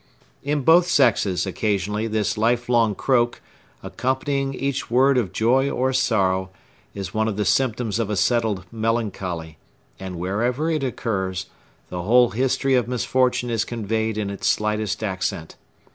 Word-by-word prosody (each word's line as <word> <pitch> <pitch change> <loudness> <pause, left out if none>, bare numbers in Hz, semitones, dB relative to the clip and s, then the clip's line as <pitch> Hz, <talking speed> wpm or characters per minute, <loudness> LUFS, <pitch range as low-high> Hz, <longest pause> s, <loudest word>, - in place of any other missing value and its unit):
In 145 +1 -1
both 170 +4 +5
sexes, 110 - +2
occasionally, 105 +2 -1
this 110 -2 -1
lifelong 115 -1 +2
croak, 120 -1 +1 0.4
accompanying 135 +1 -2
each 135 0 -3
word 130 +3 +4
of 115 -7 0
joy 130 +5 +2
or 130 0 0
sorrow, 95 -7 +1 0.5
is 95 -2 -6
one 110 0 +1
of 105 -2 -3
the 105 - 0
symptoms 115 0 0
of 110 -3 -1
a 105 - -1
settled 110 -2 +1
melancholy; 100 -9 -3 0.4
and 95 -1 -6
wherever 120 - -1
it 155 -3 -1
occurs, 95 -7 -2 0.4
the 90 - -4
whole 120 +6 +4
history 130 +3 +1
of 125 -2 +2
misfortune 125 0 0
is 115 -1 +1
conveyed 110 -1 -2
in 100 -2 -2
its 100 - -3
slightest 105 0 -1
accent. 95 -5 -3
115 Hz, 145 wpm, -22 LUFS, 100-125 Hz, 0.5 s, both